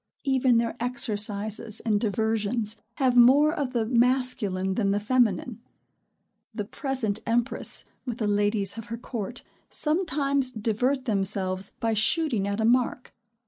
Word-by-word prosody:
Even 260 -3 +3
their 230 -1 0
exercises 215 -3 -2
and 210 -2 +1
diversions 220 0 0 0.2
have 260 -3 +2
more 275 +6 +6
of 285 -6 -2
the 230 -2 +1
masculine 235 -6 +1
than 200 -1 0
the 200 +1 +1
feminine. 230 0 +1 0.9
The 210 - -3
present 230 -3 -2
empress, 235 +2 0 0.2
with 240 -3 -4
the 220 -4 -1
ladies 205 0 +1
of 225 - -8
her 230 +2 -5
court, 235 0 -5 0.3
sometimes 280 -5 0
divert 250 +4 -1
themselves 195 -3 0
by 225 -1 0
shooting 220 - +1
at 200 +1 -2
a 220 - +1
mark. 245 +1 +1
230 Hz, 135 wpm, -26 LUFS, 205-255 Hz, 0.9 s, more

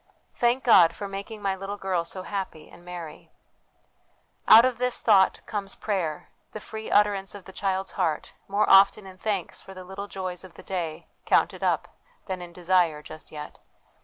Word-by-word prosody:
' - - -42
Thank 245 +2 +1
God 180 -8 +6
for 200 - -5
making 200 +2 -7
my 195 -1 0
little 195 +2 -6
girl 185 -4 -1
so 185 +2 -6
happy 190 -6 -5
and - - -15
merry! 175 -3 -9 0.6
' - - -41
Out 230 - +8
of 250 -2 -1
this 250 0 +1
thought 200 -4 +4
comes 200 -2 -5
prayer, 180 -8 -3 0.2
the 215 - -5
free 220 +1 -8
utterance 205 -1 +2
of 200 - -11
the 190 - -12
child's 190 0 -2
heart, 155 -2 -2
more 200 +2 +1
often 195 +1 +6
in 185 -1 -12
thanks 200 -5 -2
for 190 - -12
the 185 - -8
little 190 +2 -7
joys 185 -2 -5
of 185 -2 -13
the - - -12
day 170 -5 -4 0.2
counted - - +2
up - - +1 0.4
than 185 -2 -4
in 175 -1 -9
desire, 175 -3 +1
just 155 +1 -11
yet. 150 -1 -9
190 Hz, 190 wpm, -26 LUFS, 180-205 Hz, 0.6 s, Out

